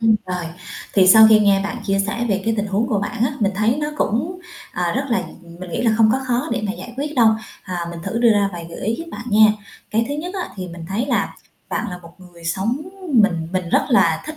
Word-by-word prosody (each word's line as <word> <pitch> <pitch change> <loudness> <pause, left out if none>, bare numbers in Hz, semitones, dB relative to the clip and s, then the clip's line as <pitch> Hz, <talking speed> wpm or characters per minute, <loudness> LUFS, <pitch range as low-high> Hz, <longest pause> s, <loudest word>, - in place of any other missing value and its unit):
Ừm, 225 -1 +4
rồi 180 -2 -3 0.5
thì 190 -2 +5
sau 220 +3 +9
khi 215 -1 +7
nghe 200 -2 +4
bạn 240 - -3
chia 195 0 +1
sẻ 235 +3 -2
về 195 -1 0
cái 225 - +1
tình 210 0 -1
huống 205 +4 0
của 220 -5 0
bạn 225 +3 -1
á, 260 - 0
mình 200 -1 +2
thấy 215 +6 +1
nó 295 - -1
cũng, 315 - -1 0.4
ờ, 175 -1 0
rất 270 - -1
là 235 - +1 0.4
mình 180 -1 -8
nghĩ - - -2
là 235 - +3
không 225 -1 +5
có 265 - +1
khó 250 +5 0
để - - -1
mà 200 - -1
giải 240 +2 -9
quyết 295 +2 -3
đâu. 235 -4 +5 0.3
À, 175 -2 -4
mình 170 - -7
thử 230 - -3
đưa 235 -1 +5
ra 205 -1 +2
vài 170 -1 -7
gợi - - -8
ý 220 +3 0
giúp 330 - -5
bạn - - -7
nha. 215 0 +6 0.4
Cái 225 +2 +1
thứ 285 - -2
nhất 350 +6 -5
á 370 - -3
thì 185 -1 -5
mình 170 -1 -9
thấy 225 +7 -1
là - - 0 0.3
bạn - - -2
là 180 - -6
một 170 -1 -15
người 175 -2 -15
sống 195 +9 0 0.4
mình 175 -8 +3
mình 185 -2 -2
rất - - +3
là 165 -10 +3
thích 310 - -6
210 Hz, 265 wpm, -20 LUFS, 185-240 Hz, 0.5 s, sau